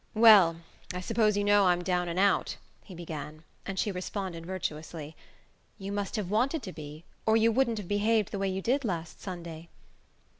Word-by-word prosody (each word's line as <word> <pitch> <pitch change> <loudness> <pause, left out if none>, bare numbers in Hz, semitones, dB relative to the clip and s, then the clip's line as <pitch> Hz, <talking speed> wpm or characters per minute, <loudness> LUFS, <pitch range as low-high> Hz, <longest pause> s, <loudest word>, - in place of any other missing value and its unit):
"Well, 200 -7 +7 0.3
I - - -2
suppose 210 +2 +1
you 205 - +1
know 205 -1 +4
I'm 175 0 +2
down 180 -1 0
and 170 - -4
out," 195 0 +2 0.3
he 185 - -11
began; 155 -2 -7 0.2
and 195 -1 -4
she 205 - 0
responded 180 -2 -5
virtuously: 160 -4 -5 0.6
"You 195 -1 -6
must 200 +1 -3
have 205 -4 -3
wanted 260 +8 +1
to 185 -4 -7
be, 155 +1 -9 0.2
or 220 0 +5
you 225 +1 +4
wouldn't 235 -1 +1
have 205 -4 -6
behaved 210 +1 +1
the 200 - -3
way 195 0 0
you 190 0 -3
did 275 +4 +1
last 170 -7 -4
Sunday." 170 -3 -7
190 Hz, 185 wpm, -29 LUFS, 170-210 Hz, 0.6 s, Well